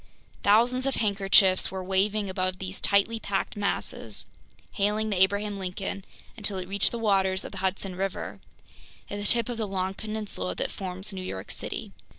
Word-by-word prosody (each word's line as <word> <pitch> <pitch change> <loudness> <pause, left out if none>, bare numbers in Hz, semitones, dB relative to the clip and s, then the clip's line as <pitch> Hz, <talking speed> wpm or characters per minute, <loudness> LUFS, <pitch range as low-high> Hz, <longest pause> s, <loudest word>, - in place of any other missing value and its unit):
Thousands 245 +5 +4
of 275 - 0
handkerchiefs 195 -3 +4
were 190 -1 -4
waving 200 +2 +1
above 185 0 -1
these 190 0 -5
tightly 205 +3 +3
packed 195 -3 -2
masses, 205 -1 -2 0.5
hailing 210 +1 +1
the 185 -2 +1
Abraham 200 +1 +3
Lincoln 190 +1 -4 0.3
until 205 -3 -1
it 185 -1 -4
reached 200 +1 +3
the 235 - -3
waters 195 -4 +2
of - - -7
the 195 - -7
Hudson 190 0 -1
River, 180 - -3 0.7
at 205 - -3
the 205 - -4
tip 235 -1 +3
of 240 -2 -3
the 215 - 0
long 190 -1 -1
peninsula 210 - -4
that - - -2
forms 190 +1 -5
New 190 - -4
York 95 - -5
City. - - -4
195 Hz, 170 wpm, -27 LUFS, 190-210 Hz, 0.7 s, Thousands